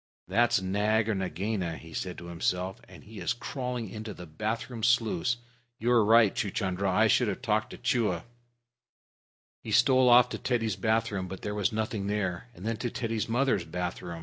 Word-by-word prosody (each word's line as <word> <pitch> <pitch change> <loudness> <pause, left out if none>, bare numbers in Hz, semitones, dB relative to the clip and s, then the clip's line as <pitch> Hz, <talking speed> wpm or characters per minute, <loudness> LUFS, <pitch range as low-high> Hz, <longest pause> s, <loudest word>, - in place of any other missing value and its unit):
"That's 120 -3 +3
Nag 105 +3 +1
or - - +2
Nagaina," 95 -2 -2
he 80 +3 -12
said 90 -2 -4
to 85 - -9
himself, 90 +2 -2
"and - - -13
he 110 +1 -11
is - - 0
crawling 125 -1 -4
into 110 +1 -7
the 90 - -9
bath 110 +8 -3
room 120 -3 -7
sluice. 115 -1 +2 0.4
You're 120 0 +3
right, 110 -1 +5
Chuchundra; 95 -1 -1
I 95 +4 +4
should 115 +2 +3
have 105 +5 -3
talked 110 -2 +1
to - - -9
Chua." 115 -8 0 1.4
He 110 - -6
stole 125 +3 +5
off 120 0 +7
to - - -5
Teddy's 115 -5 0
bath 110 +3 +1
room, 95 -2 -3
but 95 +1 -8
there 105 - -2
was 105 -2 0
nothing 110 -2 -2
there, 100 0 -2
and 95 - -10
then 115 0 -1
to 120 - -2
Teddy's 115 -2 -2
mother's 120 -5 +2
bathroom. 85 0 -5
110 Hz, 185 wpm, -29 LUFS, 95-115 Hz, 1.4 s, off